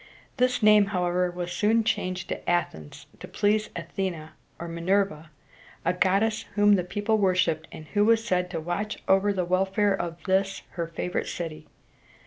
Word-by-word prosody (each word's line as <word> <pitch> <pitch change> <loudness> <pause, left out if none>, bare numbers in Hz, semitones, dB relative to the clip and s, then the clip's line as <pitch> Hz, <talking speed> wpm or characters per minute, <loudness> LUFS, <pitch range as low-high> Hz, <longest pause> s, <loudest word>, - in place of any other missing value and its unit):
This 250 -2 +1
name, 210 -1 +6
however, 180 -2 0
was 175 0 -5
soon 215 +5 +2
changed 185 -5 -2
to - - -4
Ath´ens 80 - -2
to - - -9
please 210 +1 +1
A 170 - -4
the´ne 170 -3 -4 0.3
(or 170 - -6
Mi 170 0 -6
ner´va), 185 -4 0 0.6
a 180 - +2
goddess 200 +4 +1
whom 205 0 +5
the 185 -3 +2
people 205 +4 -1
worshiped, 180 -5 +1
and 155 - -10
who 205 0 +2
was 225 0 +3
said 180 -5 0
to 170 -2 -3
watch 175 +6 -3
over 195 +2 +4
the 185 -3 -1
welfare 195 +3 +1
of 170 -3 -4
this 195 +1 0
her 170 -1 -4
favorite 170 +2 -3
city. 165 -3 -6
185 Hz, 170 wpm, -26 LUFS, 175-205 Hz, 0.6 s, name